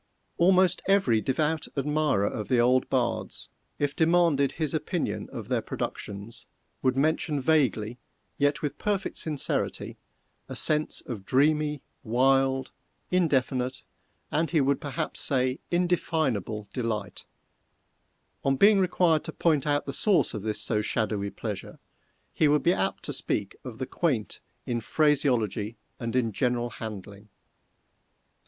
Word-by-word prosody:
Almost 185 Hz, 0 st, +4 dB
every 185 Hz, -, +3 dB
devout 150 Hz, +5 st, 0 dB
admirer 150 Hz, -6 st, +1 dB
of 105 Hz, 0 st, -3 dB
the 125 Hz, -, +2 dB
old 125 Hz, +2 st, +3 dB
bards, 120 Hz, -3 st, -1 dB, 0.3 s
if 145 Hz, 0 st, -1 dB
demanded 160 Hz, -5 st, +3 dB
his 155 Hz, -3 st, -2 dB
opinion 160 Hz, +2 st, -2 dB
of -, -, -7 dB
their -, -, 0 dB
productions, 105 Hz, +3 st, -6 dB, 0.3 s
would 130 Hz, 0 st, +1 dB
mention 150 Hz, 0 st, +1 dB
vaguely, 130 Hz, -6 st, +1 dB, 0.4 s
yet 145 Hz, +1 st, +1 dB
with 145 Hz, -, -3 dB
perfect 205 Hz, -1 st, -1 dB
sincerity, 150 Hz, -4 st, -2 dB, 0.5 s
a -, -, -5 dB
sense 155 Hz, 0 st, +1 dB
of 110 Hz, -6 st, -7 dB
dreamy, 150 Hz, +4 st, +2 dB, 0.2 s
wild, 135 Hz, +2 st, +2 dB, 0.4 s
indefinite, 130 Hz, -7 st, +1 dB, 0.5 s
and 160 Hz, +2 st, +1 dB
he 165 Hz, -, +2 dB
would 140 Hz, 0 st, +1 dB
perhaps 140 Hz, -2 st, -3 dB
say, 130 Hz, -1 st, +1 dB
indefinable 155 Hz, -, 0 dB
delight; 110 Hz, -6 st, -3 dB, 1.2 s
on 135 Hz, 0 st, +2 dB
being 200 Hz, +6 st, +6 dB
required 175 Hz, -4 st, +2 dB
to -, -, -3 dB
point 155 Hz, -3 st, +1 dB
out 145 Hz, 0 st, +1 dB
the 140 Hz, -, -4 dB
source 200 Hz, +4 st, +2 dB
of 105 Hz, -, -4 dB
this 110 Hz, +1 st, -3 dB
so 105 Hz, -2 st, 0 dB
shadowy 105 Hz, -2 st, -1 dB
pleasure, -, -, -6 dB, 0.6 s
he 155 Hz, -, +3 dB
would 150 Hz, 0 st, +3 dB
be 175 Hz, -, +4 dB
apt 95 Hz, -, -1 dB
to -, -, -2 dB
speak 100 Hz, -2 st, -2 dB
of 125 Hz, -4 st, -8 dB
the 130 Hz, -, -3 dB
quaint 130 Hz, -8 st, -1 dB, 0.3 s
in 120 Hz, -1 st, -2 dB
phraseology 120 Hz, -5 st, +1 dB, 0.2 s
and 115 Hz, 0 st, -3 dB
in 120 Hz, -3 st, +2 dB
general 120 Hz, +1 st, 0 dB
handling. 105 Hz, -1 st, -8 dB
135 Hz, 135 wpm, -27 LUFS, 115-155 Hz, 1.2 s, being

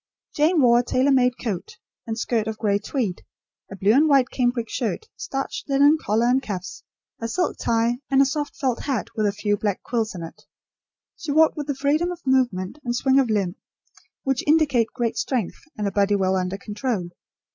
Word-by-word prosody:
Jane 315 Hz, +3 st, +3 dB
wore 240 Hz, -1 st, +6 dB
a -, -, +1 dB
tailor 260 Hz, +3 st, +2 dB
made 250 Hz, -2 st, +3 dB
coat 200 Hz, -7 st, -4 dB, 0.3 s
and 225 Hz, -1 st, -3 dB
skirt 230 Hz, -2 st, -1 dB
of 220 Hz, -1 st, -3 dB
grey 205 Hz, -2 st, +1 dB
tweed, 210 Hz, -4 st, -3 dB, 0.5 s
a -, -, -6 dB
blue 195 Hz, +2 st, +2 dB
and 300 Hz, +5 st, +4 dB
white 270 Hz, -3 st, +4 dB
cambric 245 Hz, -2 st, 0 dB
shirt, 250 Hz, -, -3 dB
starched 270 Hz, +1 st, -5 dB
linen 285 Hz, +3 st, +5 dB
collar 220 Hz, +3 st, +1 dB
and 255 Hz, +2 st, +3 dB
cuffs, 185 Hz, -6 st, -6 dB, 0.4 s
a 230 Hz, -, -2 dB
silk 355 Hz, +8 st, -1 dB
tie, 235 Hz, +1 st, +1 dB
and 270 Hz, -1 st, +3 dB
a 275 Hz, -, +6 dB
soft 290 Hz, +2 st, -3 dB
felt 260 Hz, -6 st, -1 dB
hat 265 Hz, -7 st, -2 dB
with 215 Hz, -1 st, +1 dB
a -, -, +1 dB
few 205 Hz, 0 st, -1 dB
black 205 Hz, -2 st, -2 dB
quills 225 Hz, -4 st, -2 dB
in 170 Hz, -, -6 dB
it. 165 Hz, -, -10 dB, 0.8 s
She 320 Hz, -, -4 dB
walked 315 Hz, +2 st, +4 dB
with 295 Hz, -2 st, -5 dB
the 285 Hz, -, -1 dB
freedom 300 Hz, +6 st, +1 dB
of 350 Hz, -3 st, -9 dB
movement 250 Hz, -4 st, +1 dB
and 240 Hz, -1 st, -2 dB
swing 265 Hz, +2 st, +3 dB
of 260 Hz, -4 st, +2 dB
limb 200 Hz, -4 st, 0 dB, 0.7 s
which 270 Hz, -2 st, 0 dB
indicate 295 Hz, -7 st, +3 dB
great 240 Hz, -3 st, -2 dB
strength 245 Hz, -9 st, -2 dB, 0.2 s
and 210 Hz, -1 st, -1 dB
a -, -, -1 dB
body 205 Hz, 0 st, +2 dB
well 190 Hz, -1 st, +1 dB
under 185 Hz, +1 st, -1 dB
control. 205 Hz, -3 st, -3 dB
240 Hz, 200 wpm, -23 LUFS, 205-275 Hz, 0.8 s, wore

